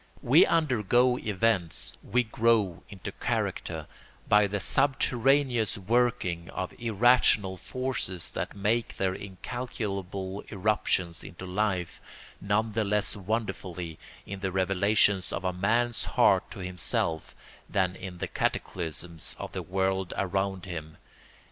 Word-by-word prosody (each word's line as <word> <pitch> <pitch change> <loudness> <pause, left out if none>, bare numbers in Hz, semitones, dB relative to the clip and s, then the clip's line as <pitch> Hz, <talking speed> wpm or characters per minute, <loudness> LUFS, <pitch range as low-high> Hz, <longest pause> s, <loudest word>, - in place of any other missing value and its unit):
We - - +6
undergo 125 - +3
events, 105 -4 0
we 125 +1 +1
grow 110 -5 +2
into 95 -3 -7
character, - - -2 0.4
by 105 0 +5
the 100 +1 -2
subterraneous 135 -1 +2
working 100 -5 0
of 95 - -4
irrational 115 -3 +4
forces 125 -6 -2
that 85 +4 -4
make 110 +4 0
their 95 -1 +1
incalculable 100 -2 -5
irruptions 95 -5 0
into 90 +2 -9
life 95 -2 -1 0.4
none 110 +2 +1
the 110 +1 0
less 105 +1 0
wonderfully 95 -5 -3 0.3
in 100 0 -6
the 95 -1 -2
revelations 95 +1 +2
of - - -3
a 90 -1 0
man's 115 +5 +1
heart - - +3
to 100 - -8
himself 85 -3 -1 0.3
than 95 -1 +1
in 95 -2 -7
the - - -3
cataclysms 85 -1 -2
of - - -6
the - - -4
world 95 0 -1
around 95 0 -1
him. 80 -4 -7
100 Hz, 120 wpm, -28 LUFS, 90-115 Hz, 0.4 s, We